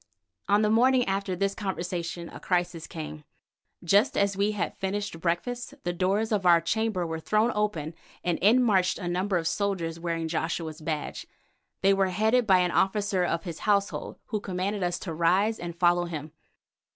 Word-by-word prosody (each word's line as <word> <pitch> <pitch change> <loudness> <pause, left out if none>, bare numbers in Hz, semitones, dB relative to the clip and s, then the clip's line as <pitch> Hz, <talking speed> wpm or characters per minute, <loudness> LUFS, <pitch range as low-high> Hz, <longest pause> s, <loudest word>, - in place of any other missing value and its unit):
On 205 +1 +4
the 210 - +2
morning 250 +2 +4
after 195 -1 -1
this 195 +2 0
conversation 175 -4 -4
a - - -10
crisis 175 -2 -1
came. 155 -2 -7 0.6
Just 200 +5 +3
as 200 -1 +2
we 200 +2 +1
had 205 - -2
finished 200 -2 -3
breakfast 240 +11 -2
the 175 - -1
doors 195 +5 0
of 205 -3 +1
our 175 -2 +6
chamber 205 +1 -1
were 160 -1 -4
thrown 215 +7 +2
open 170 -7 -1 0.3
and 175 -2 0
in 235 +6 +5
marched 190 -6 +2
a 175 - -5
number 185 +2 0
of 165 - -2
soldiers 170 -4 -1
wearing 165 -1 -2
Joshua's 160 -1 -3
badge. 155 -1 -4 0.6
They 195 +1 +6
were 195 0 +2
headed 220 +5 +2
by 185 -2 +6
an 180 -1 +1
officer 195 -1 +1
of 165 -1 -1
his 170 -4 -6
household, 200 -1 0
who 215 - -2
commanded 195 +1 -3
us 175 -1 0
to 165 - -6
rise 185 +7 +2
and 170 -1 -6
follow 175 0 +3
him. 155 -3 -6
185 Hz, 175 wpm, -27 LUFS, 170-205 Hz, 0.6 s, our